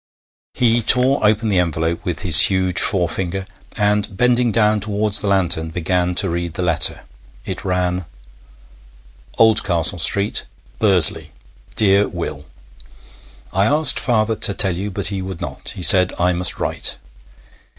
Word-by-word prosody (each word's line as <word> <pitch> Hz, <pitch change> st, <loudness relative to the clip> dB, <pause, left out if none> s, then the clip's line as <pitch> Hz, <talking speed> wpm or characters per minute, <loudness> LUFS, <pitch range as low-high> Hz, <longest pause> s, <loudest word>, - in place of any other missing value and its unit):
He 120 Hz, -1 st, +1 dB
tore 125 Hz, +4 st, +1 dB
open 105 Hz, +1 st, +1 dB
the 100 Hz, -4 st, 0 dB
envelope 85 Hz, -1 st, -3 dB
with 90 Hz, -, -5 dB
his 85 Hz, -6 st, +6 dB
huge 95 Hz, -2 st, 0 dB
forefinger, 95 Hz, 0 st, -2 dB, 0.3 s
and, 105 Hz, -2 st, -1 dB
bending 125 Hz, 0 st, +1 dB
down 105 Hz, -1 st, +1 dB
towards 105 Hz, 0 st, -2 dB
the 105 Hz, -, -4 dB
lantern, 85 Hz, -5 st, 0 dB
began 90 Hz, +2 st, -2 dB
to 95 Hz, -, 0 dB
read 85 Hz, -1 st, -5 dB
the 90 Hz, -, -4 dB
letter. 85 Hz, -3 st, 0 dB, 0.4 s
It -, -, -7 dB
ran: 90 Hz, -1 st, -3 dB, 1.3 s
'OLDCASTLE 100 Hz, -6 st, +1 dB
STREET, 100 Hz, +6 st, 0 dB, 0.3 s
'BURSLEY. 95 Hz, -7 st, +3 dB, 0.5 s
'DEAR 100 Hz, -1 st, +1 dB
WILL, 75 Hz, -5 st, -7 dB, 1.1 s
'I 95 Hz, +2 st, +1 dB
asked 150 Hz, +3 st, +4 dB
father 110 Hz, -3 st, -1 dB
to 100 Hz, -2 st, +3 dB
tell 95 Hz, -3 st, +2 dB
you, 100 Hz, +4 st, -5 dB
but 100 Hz, -1 st, -4 dB
he 100 Hz, -2 st, -5 dB
would 95 Hz, -2 st, -8 dB
not. -, -, -8 dB
He 90 Hz, -, -6 dB
said 90 Hz, 0 st, +6 dB
I 90 Hz, +1 st, 0 dB
must 90 Hz, 0 st, -1 dB
write. -, -, -1 dB
95 Hz, 140 wpm, -17 LUFS, 90-105 Hz, 1.3 s, his